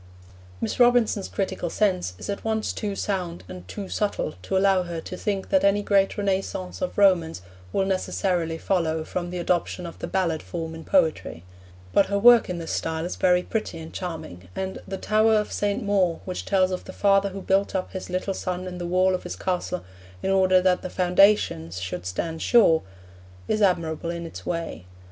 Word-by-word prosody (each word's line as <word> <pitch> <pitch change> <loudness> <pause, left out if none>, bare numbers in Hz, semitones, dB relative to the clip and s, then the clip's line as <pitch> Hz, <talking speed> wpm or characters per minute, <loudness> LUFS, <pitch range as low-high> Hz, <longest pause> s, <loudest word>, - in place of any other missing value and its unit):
Miss 110 - -3
Robinson's 240 -5 +4
critical 190 -3 -2
sense 180 - 0
is - - -8
at 200 - -4
once 220 -1 -1
too 205 -2 -3
sound 180 -4 -3
and 90 0 -10
too 200 - -6
subtle 205 -7 -1
to 190 - -1
allow 190 -1 +4
her 170 -2 -5
to 185 - -7
think 195 0 -3
that 285 - +3
any 200 +1 +3
great 195 -1 +2
Renaissance 195 -1 -2
of 275 - -3
Romance 170 - +3 0.3
will 195 - +1
necessarily 180 -3 -1
follow 160 -3 0
from 175 +2 -4
the 180 - -5
adoption 175 +1 -1
of 170 - -9
the - - -4
ballad 175 -4 0
form 165 -2 -5
in 160 0 -8
poetry; 160 - +1 0.5
but 200 - +4
her 200 - 0
work 235 +1 +7
in 180 - -2
this 165 -1 -5
style 160 0 -2
is 180 - -4
very 180 -1 +3
pretty 215 -5 -3
and 160 0 -9
charming, 160 - -6
and 190 0 -4
The 195 - -4
Tower 215 +2 +3
of 210 -1 0
St. 205 0 -1
Maur, 190 -5 +1
which 185 -1 -4
tells 190 -2 +2
of 185 - -4
the - - -9
father 200 0 +3
who 195 0 -7
built 195 +1 +1
up 185 - -2
his 190 -1 -6
little 185 +2 -1
son 185 -1 -4
in 180 -1 -6
the 175 - -3
wall 185 +1 +3
of 185 - -1
his 180 - -6
castle 180 - -2 0.4
in - - +1
order 185 -1 +4
that 185 -1 +3
the 185 - -5
foundations 180 - +3
should 90 0 -5
stand 160 - -3
sure, 200 -10 +5 0.7
is 215 - 0
admirable 170 -4 +1
in 170 0 -4
its 165 - -9
way. 165 - -4
185 Hz, 195 wpm, -25 LUFS, 170-200 Hz, 0.7 s, work